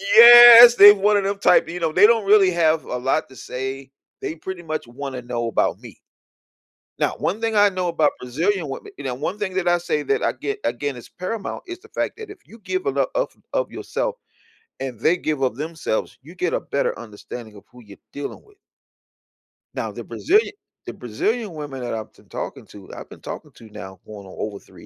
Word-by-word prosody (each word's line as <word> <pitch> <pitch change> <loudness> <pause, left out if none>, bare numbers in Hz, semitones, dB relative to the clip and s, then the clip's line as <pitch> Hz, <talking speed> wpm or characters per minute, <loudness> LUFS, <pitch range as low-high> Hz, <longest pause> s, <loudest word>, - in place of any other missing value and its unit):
Yes, 240 0 +11
they've 205 -1 +9
one 205 +1 +3
of 200 - 0
them 200 0 -2
type, 180 - +4
you 175 +2 -6
know, 165 -2 -1
they 185 +6 +5
don't 225 -3 +2
really 195 -2 +5
have 160 -2 +1
a 125 - -4
lot 135 +5 -1
to 130 - -16
say. 130 +1 -7 0.3
They 160 - -4
pretty 180 +2 -8
much 155 -6 -5
wanna 130 0 -7
know 120 -1 -3
about 115 - 0
me. - - -13 1.0
Now, - - 0
one 205 - -2
thing 225 -1 -2
I 205 0 +5
know 185 -2 -3
about 160 -3 +1
Brazilian 165 +7 -2
women 135 - -8
you 145 - -9
know, 130 - -2
one 170 +9 -4
thing 190 -3 -3
that 185 -2 0
I 175 - +3
say 155 -4 -2
that - - -1
I - - 0
get 420 0 -5
again 145 -3 -3
is 120 - -12
paramount 195 +3 -6
is 355 0 -8
the - - -18
fact - - -4
that 435 -2 -9
if 400 -3 -14
you 225 - -16
give 370 - -3
enou 410 - 0
...ough - - -2 0.2
of - - -1
yourself - - -4 0.6
and 130 -3 -5
they 170 +8 +2
give 150 -5 -3
up 125 -3 0
themselves, 155 -6 -4
you 160 +6 -14
get 180 -2 -2
a - - 0
better 140 - -2
understanding 110 0 -10
of 100 - -17
who 125 -1 -16
you're 100 -2 -15 0.2
dealing 145 0 -7
with. 420 -1 -24 1.2
Now - - -4
the - - -8
Brazilian 415 +5 +1 0.3
the 120 - -7
Brazilian 205 - -3
women 145 -4 -7
that 120 - -4
I've 110 -1 -6
tin - - -23
talking - - -7
to, 100 -2 -14
I've - - -10
been - - -13
talking - - -8
to 115 - -15
now 95 -3 -10
going 105 -2 -10
on 95 - -13
over 105 -2 -5
3 - - -17
165 Hz, 215 wpm, -21 LUFS, 125-205 Hz, 1.2 s, Yes